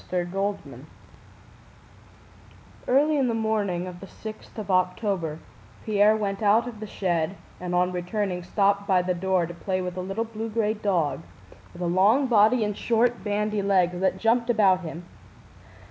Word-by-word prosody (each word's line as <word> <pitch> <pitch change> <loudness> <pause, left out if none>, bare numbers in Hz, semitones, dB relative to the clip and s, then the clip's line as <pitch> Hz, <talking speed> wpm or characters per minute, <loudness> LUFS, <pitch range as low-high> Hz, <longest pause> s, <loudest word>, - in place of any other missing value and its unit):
CHAPTER 180 -1 -1
XI 195 +1 -4 2.0
Early 295 +4 +3
in 265 - +2
the 230 - 0
morning 210 -5 -1
of 180 -1 -8
the 195 - -10
sixth 215 +2 -10
of 205 -2 -4
October 185 -3 0 0.5
Pierre 215 0 +4
went 200 -1 -3
out 220 +3 +3
of 230 -3 -8
the 215 - -6
shed, 175 -3 -1 0.2
and 180 0 -3
on 180 +1 +2
returning 180 +1 -2
stopped 200 +2 +1
by 185 -3 +3
the 180 0 0
door 185 0 0
to 175 - -8
play 185 +3 -3
with 180 -1 -4
a - - -2
little 195 +5 -2
blue 225 0 -6
gray 215 -1 0
dog, 175 -10 -1 0.5
with 175 - -7
a - - 0
long 200 +10 +3
body 225 0 +4
and 210 -1 -2
short 235 +2 +1
bandy 210 0 -1
legs, 185 -3 +2
that 190 0 +1
jumped 235 +4 +1
about 200 -5 +4
him. 170 0 -8
200 Hz, 165 wpm, -25 LUFS, 180-220 Hz, 2.0 s, Pierre